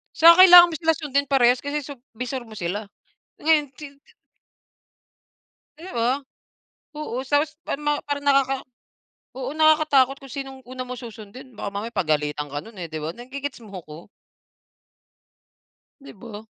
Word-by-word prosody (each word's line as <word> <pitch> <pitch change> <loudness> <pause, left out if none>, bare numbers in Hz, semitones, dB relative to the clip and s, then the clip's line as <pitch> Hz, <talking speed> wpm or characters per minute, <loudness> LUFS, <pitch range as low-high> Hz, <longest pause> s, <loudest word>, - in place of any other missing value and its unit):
Saka 335 +2 +7
kailangan 350 -1 +9
mo - - -4
sila 325 -1 +2
sundin 280 -2 -1
parehas 250 -2 +3
kasi 285 +2 -4
sup 275 -2 -10 0.2
bisor 250 +1 -5
mo 220 - -12
sila. 200 +2 -4 0.5
Ngayon 305 -2 +2
tintin 280 0 -12 1.8
Di 355 +4 -10
ba, 250 +4 0 0.7
oo, 300 -5 -5
tapos 295 +3 0
parang 300 - -4
ma 295 - +2
parang 285 0 -4
nakaka 270 -1 +3 0.8
oo 260 0 -4
nakakatakot 305 -4 +3
kung 275 -1 -14
sinong 270 -1 -7
una 255 0 -6
mo 250 - -6
susundin 230 +2 -11
baka 200 - -4
mamaya 220 +4 -5
pagalitan 150 -4 -1
ka 145 - -4
nun 225 +5 -14
eh, - - -4
'di 160 - -5
ba 155 - -3
nage-gets 265 +2 -7
mo 195 -2 -8
ko? 150 0 -10 2.0
Di 275 - -12
ba? 215 0 -11
265 Hz, 150 wpm, -23 LUFS, 225-290 Hz, 2.0 s, kailangan